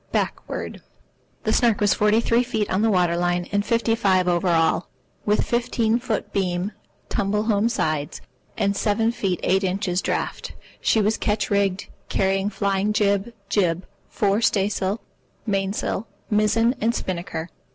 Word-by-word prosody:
BACKWORD - - -3 0.6
The - - +1
Snark 235 -4 +3
was 205 -1 +4
forty 210 +1 +3
three 235 +1 +3
feet 220 -4 -1
on 190 - +1
the 225 - +3
water 180 -4 +2
line 175 0 0
and 205 0 +1
fifty 230 +1 +1
five 190 -5 +2
over 175 +1 +1
all, 165 0 +2 0.4
with 210 +1 +2
fifteen 235 -1 +1
feet 230 -4 -3
beam 185 0 -1 0.4
(tumble 210 -1 0
home 215 0 +2
sides) 155 -10 -1 0.4
and 200 0 +1
seven 225 +2 +1
feet 195 -7 -1
eight 190 +2 +2
inches 185 -1 0
draught. - - -3 0.3
She 220 - +2
was 210 +2 +1
ketch 210 0 -1
rigged, 200 -1 +1 0.2
carrying 195 +1 +1
flying 200 0 0
jib, 200 +1 +1 0.2
jib, 180 -3 +1 0.2
fore 205 +1 +1
staysail, 200 -1 +1 0.4
main 195 -3 0
sail, 210 +1 -3 0.2
mizzen, 215 +3 +3
and 230 +2 +1
spinnaker. 170 -2 -4
200 Hz, 150 wpm, -23 LUFS, 185-220 Hz, 0.6 s, was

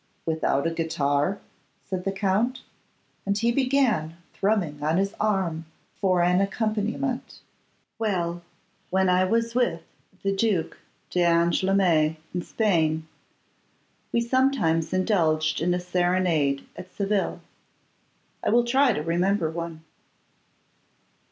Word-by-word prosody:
'Without 160 -3 0
a 165 - +1
guitar?' 155 +1 0 0.5
said 185 -1 -4
the 195 - +1
Count, 205 +6 0 0.6
and 200 0 0
he 235 +2 +2
began 250 - +1 0.2
thrumming 190 -8 0
on 155 +3 +1
his 195 +1 0
arm 190 -6 0 0.3
for 185 -3 +1
an 180 +2 +3
accompaniment. 220 +5 -2 0.6
'Well, 175 -6 -1 0.5
when 190 0 +2
I 180 +1 +4
was 230 +3 0
with 240 -9 0 0.4
the 195 0 0
Duc 195 -5 0 0.4
d'Angoulême 170 -1 +3 0.2
in 175 - -1
Spain, 160 -7 0 1.0
we 235 - +2
sometimes 235 -10 +1
indulged 160 -5 +1
in 175 +2 +1
a 180 - +1
serenade 175 -5 +1
at 185 - -10
Seville. 200 -1 -1 1.0
I - - +1
will 235 +2 +4
try 260 +1 +3
to 150 - -3
remember 175 +1 +1
one. 165 -1 -6
185 Hz, 115 wpm, -25 LUFS, 165-210 Hz, 1.0 s, I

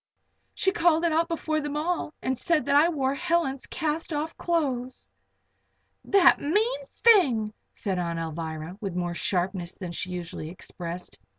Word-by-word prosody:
She 385 - +2
called 340 -5 +3
it 335 - +2
out 325 +2 +2
before 315 -2 -1
them 295 0 -3
all, 330 0 -1
and 260 - 0
said 315 +4 +1
that 280 0 +2
I 305 +4 +6
wore 275 -5 0
Helen's 280 -2 0
cast 320 0 -2
off 305 +1 -2
clothes!" 260 -7 -1 1.0
"The 375 -3 +6
mean 445 +11 0
thing!" 260 - +4 0.2
said 190 -3 -2
Aunt 170 -1 -2
Alvirah, 160 +1 -5
with 195 -4 -4
more 175 -1 -1
sharpness 180 0 -1
then 180 -3 -5
she 180 +1 -4
usually 175 -3 -5
expressed. 175 - -7
275 Hz, 155 wpm, -27 LUFS, -, 1.0 s, I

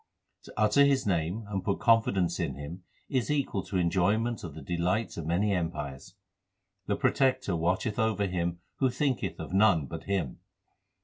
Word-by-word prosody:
To - - -12
utter 105 +6 +5
His 140 -2 +3
name 90 +3 -1
and 100 -2 -3
put 100 - -1
confidence 100 -7 +3
in - - -2
Him 75 +6 -7 0.3
is 130 0 -1
equal 140 -9 0
to 95 0 -2
enjoyment 100 +7 +1
of 80 -5 -7
the 80 - -8
delights 90 +8 -1
of 80 -2 -5
many 100 +5 +1
empires. 75 -2 -4 0.7
The 100 - +1
Protector 130 - +1
watcheth 95 +7 0
over 110 -3 +1
him 85 -2 -2 0.2
who 130 - +2
thinketh 130 +1 -1
of - - -6
none 95 -6 +4
but - - -7
Him. 95 -10 -2
100 Hz, 165 wpm, -29 LUFS, 85-115 Hz, 0.7 s, utter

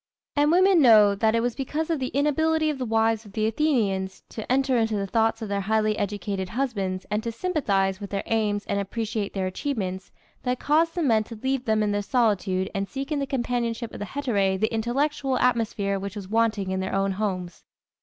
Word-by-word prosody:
And 290 0 +3
women 370 0 +5
know 215 -5 +7
that 220 +2 +1
it 230 - +2
was 240 0 0
because 300 +5 -3
of 320 - 0
the 260 - -1
inability 310 +3 +1
of 280 - -6
the 255 - -2
wives 225 0 +2
of 205 -3 -15
the 215 +1 0
Athenians 220 -7 0
to 220 +1 -6
enter 265 0 +2
into 225 -2 +1
the 200 -1 -1
thoughts 225 +2 +1
of - - -4
their 200 0 -1
highly 215 +1 +1
educated 200 -2 -3
husbands 200 -7 -2
and 210 +1 +1
to 230 - -3
sympathize 205 - 0
with 200 - -6
their 200 -1 -2
aims 210 -2 0
and 200 - -1
appreciate 210 +1 -3
their 190 -1 -1
achievements 190 -2 -3 0.3
that 250 0 -1
caused 325 +3 +2
the 345 - 0
men 225 -6 +3
to 230 - -9
leave 265 +3 -2
them 220 -2 +2
in 210 - 0
their 205 0 0
solitude 200 -5 +1
and 195 -1 -2
seek 275 +2 -5
in 295 - 0
the 275 - -2
companionship 240 -2 -2
of - - -7
the 205 - -3
hetæræ 200 -6 0
the 220 +3 0
intellectual 265 +4 0
atmosphere 220 -5 +1
which 200 0 -6
was 200 -3 -6
wanting 215 -3 +1
in 190 - -1
their 190 0 -2
own 195 0 +1
homes. 185 -3 -3
220 Hz, 215 wpm, -25 LUFS, 200-260 Hz, 0.3 s, know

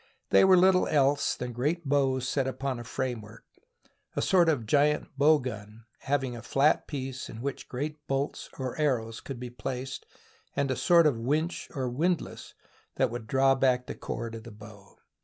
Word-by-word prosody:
They - - +7
were 190 -1 +7
little 185 0 +5
else 140 -1 +2
than 125 0 -5
great 150 +8 -1
bows 135 -2 +1
set 135 -1 0
upon 130 -1 -3
a - - -6
framework 115 -3 -5 0.4
— - - -37
a - - 0
sort 175 -3 +4
of 135 -8 0
giant 145 +6 +2
bow 150 +3 +5
gun 110 -4 -7 0.2
hav 140 0 0
ing 125 -2 -4
a 115 - -7
flat 140 +6 +2
piece 135 -3 -5
in 110 - -8
which 140 +3 -5
great 150 +3 -5
bolts 135 +2 -2
or 130 -2 -4
arrows 115 -6 0
could 135 -3 -7
be 125 -1 -6
placed, 130 +2 -5 0.5
and 140 -1 0
a - - 0
sort 170 +2 +5
of 140 -7 +2
winch, 155 +8 -1
or 130 -2 -1
windlass, 165 +8 -2 0.4
that 130 -3 +1
would 120 -2 -6
draw 135 +2 +4
back 130 -2 +2
the - - -5
cord 115 -1 -5
of 115 - -7
the 115 - -10
bow. 105 -1 -14
135 Hz, 190 wpm, -28 LUFS, 120-145 Hz, 0.5 s, They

